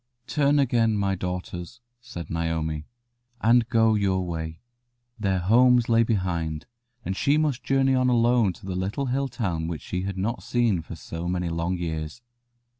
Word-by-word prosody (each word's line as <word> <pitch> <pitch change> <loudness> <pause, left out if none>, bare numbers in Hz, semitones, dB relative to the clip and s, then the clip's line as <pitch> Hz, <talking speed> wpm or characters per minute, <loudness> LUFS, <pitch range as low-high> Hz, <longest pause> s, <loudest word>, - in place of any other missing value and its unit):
"Turn 145 +1 +2
again, 115 -5 +2
my 100 -1 +1
daughters," 90 +2 -5 0.2
said 115 -9 -8
Naomi, 80 -2 -2 0.5
"and 115 +1 +3
go 110 -1 +4
your 95 -3 +1
way." 80 -2 -5 0.6
Their 95 -3 +1
homes 120 +6 +4
lay 115 0 +5
behind, 85 -8 -1 0.4
and 95 - -2
she 140 +8 +2
must 150 -4 0
journey 135 0 +2
on 130 -1 +3
alone 120 -3 +3
to - - -15
the 95 - -3
little 95 +9 -2
hill 135 +2 0
town 90 -10 -2
which 80 -3 -5
she 90 - -3
had 95 0 -4
not 110 +6 -2
seen 115 -8 +1
for 80 - -9
so 85 +1 -6
many 90 -1 -1
long 85 +2 -1
years. 80 +5 -4
100 Hz, 165 wpm, -25 LUFS, 85-120 Hz, 0.6 s, lay